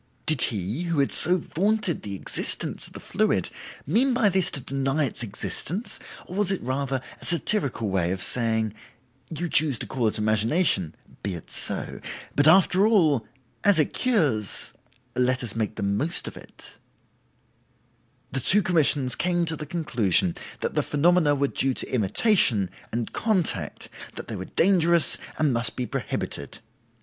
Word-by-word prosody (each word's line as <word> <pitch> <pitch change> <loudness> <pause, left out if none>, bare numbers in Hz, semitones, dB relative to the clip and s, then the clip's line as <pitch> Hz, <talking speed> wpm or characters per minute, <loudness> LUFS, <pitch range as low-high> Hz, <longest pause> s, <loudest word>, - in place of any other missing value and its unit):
Did 155 -5 +2
he, 105 - 0
who 170 -2 -2
had 140 -1 +2
so 180 +3 +5
vaunted 195 +2 -1
the 100 -2 -6
existence - - -1
of - - -17
the - - -9
fluid, - - 0 0.3
mean 245 - +2
by 225 -5 +3
this 190 -1 +1
to - - -2
deny 135 +3 -1
its 120 - -3
existence, 150 - -2 0.3
or 180 - -8
was 205 -2 +1
it 195 - -1
rather 135 +1 -2 0.2
a - - -6
satirical 165 - +1
way 95 -3 0
of 95 - -3
saying. 110 0 0 0.6
'You 170 +2 -4
choose 150 -4 +4
to - - -6
call 125 -4 -1
it 110 - -1
imagination; 110 - +1 0.3
be 100 -3 -3
it 85 - -10
so. - - 0 0.4
But 145 +1 +3
after 190 +4 +5
all, 160 - +2 0.4
as 205 -3 +5
it 155 - +1
cures, 150 - 0 0.4
let 125 +1 +1
us 115 -3 -2
make 110 -2 -2
the - - -5
most 105 - 0
of - - -7
it'? - - -13 1.5
"The 135 - -1
two 195 +11 +4
commissions 150 -7 +2
came 175 -1 0
to 160 -1 -2
the 150 -1 -8
conclusion 115 - +1 0.3
that - - -2
the - - +1
phenomena 155 0 +2
were 140 0 +1
due 135 -1 0
to - - -1
imitation, 110 - +2 0.2
and 115 0 -3
contact, 210 -8 -1 0.3
that - - -8
they - - -4
were - - -6
dangerous 170 -5 +3 0.2
and 150 -4 +1
must 120 +1 +3
be 125 - -3
prohibited. 70 -9 -5
140 Hz, 160 wpm, -25 LUFS, 115-175 Hz, 1.5 s, so